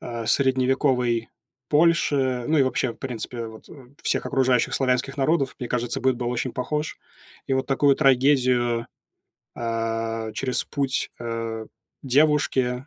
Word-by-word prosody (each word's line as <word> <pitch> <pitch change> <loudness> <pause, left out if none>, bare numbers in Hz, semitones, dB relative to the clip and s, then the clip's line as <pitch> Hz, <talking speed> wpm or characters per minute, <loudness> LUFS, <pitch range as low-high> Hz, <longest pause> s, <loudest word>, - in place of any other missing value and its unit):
э, 115 -1 -5
средневековой 130 -2 +2 0.4
Польши, 145 -6 +2
ну, 155 - +3
и 140 - +6
вообще, 130 -1 0
в - - -19
принципе, 120 -2 -5
вот, 110 0 -12
э, 135 -4 -14
всех - - 0
окружающих 130 -3 +2
славянских 130 +1 0
народов. 135 -1 +1
Мне 125 - -4
кажется 120 -1 -2
быт 130 -1 +2
был 120 0 -2
очень 125 +1 -2
похож. 150 +4 -3 0.5
И - - -2
вот 130 0 0
такую 140 0 +3
трагедию, 125 -4 +3 0.7
а, 115 -1 -2
через 130 +2 -1
путь, 135 -2 -2
э, 115 -1 -4 0.4
девушки, 135 -2 +2
130 Hz, 135 wpm, -24 LUFS, 120-135 Hz, 0.7 s, и